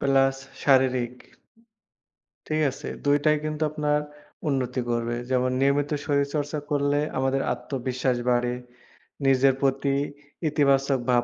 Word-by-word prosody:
Plus 135 -1 +3 0.3
শারীরিক 130 -3 +3 1.3
ঠিক 155 0 0
আছে। 135 - -8 0.2
২ 145 0 +4
টাই 155 0 +5
কিন্তু 155 0 -3
আপনার 150 -1 +1 0.5
উন্নতি 130 -2 0
করবে। 120 0 -1
যেমন 130 0 +2
নিয়মিত 140 +2 +2 0.2
শরীরচর্চা 145 +1 0
করলে 145 0 +2 0.2
আমাদের 135 +1 +1
আত্মবিশ্বাস 125 0 -2
বাড়ে। 120 0 +1 0.7
নিজের 135 0 +5
প্রতি 135 0 +1 0.6
ইতিবাচক 140 -2 +2
ভাব 120 -1 +4
135 Hz, 110 wpm, -25 LUFS, 130-145 Hz, 1.3 s, টাই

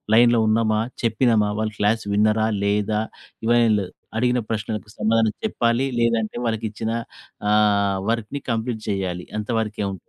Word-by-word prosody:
లైన్‌లో 120 0 +5
ఉన్నామా, 110 0 +2 0.2
చెప్పినమా, 115 -2 +2
వాళ్ళు 110 -1 -2
క్లాస్ 105 +2 +1
విన్నరా 110 +1 +3 0.2
లేదా! 105 +1 +1 0.4
ఇవన్ని 120 -1 +4
లేదు. 95 -3 -5 0.3
అడిగిన 125 +1 +2
ప్రశ్నలకు 110 -1 -3
సమాధానం 110 0 +2
చెప్పాలి. 120 - +1
లేదంటే, 115 -2 +1
వాళ్ళకి 115 -1 -1
ఇచ్చిన 110 +1 -3 0.6
ఆహ్, 100 -2 +3
వర్క్‌ని 115 +5 -3
కంప్లీట్ 115 0 -2
చేయాలి 95 -3 -2
అంత 105 +2 -4
వరకే 105 -1 -3
ఉం - - -5
110 Hz, 135 wpm, -22 LUFS, 105-115 Hz, 0.6 s, లైన్‌లో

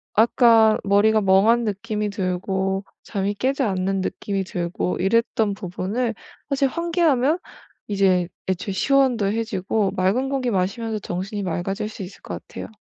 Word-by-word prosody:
아까 225 -1 +5
머리가 210 +2 +4
멍한 205 +5 +4
느낌이 210 0 -2
들고 190 0 -1 0.2
잠이 200 -1 -2
깨지 265 +6 0
않는 195 -2 0
느낌이 195 +1 -2
들고 180 0 -3
이랬던 215 +1 +1
부분을 200 +6 -2 0.4
사실 275 0 +2
환기하면 330 -2 +1 0.5
이제 190 -3 +2 0.2
애초에 190 +1 -2
시원도 260 -1 +2
해지고 210 -1 -1
맑은 200 +9 +1
공기 260 -3 -1
마시면서 210 +3 -1
정신이 195 +3 -4
맑아질 195 +4 -2
수 210 - -8
있을 185 - -11
것 - - -6
같아요. - - -7
205 Hz, 315 characters per minute, -22 LUFS, 190-230 Hz, 0.5 s, 아까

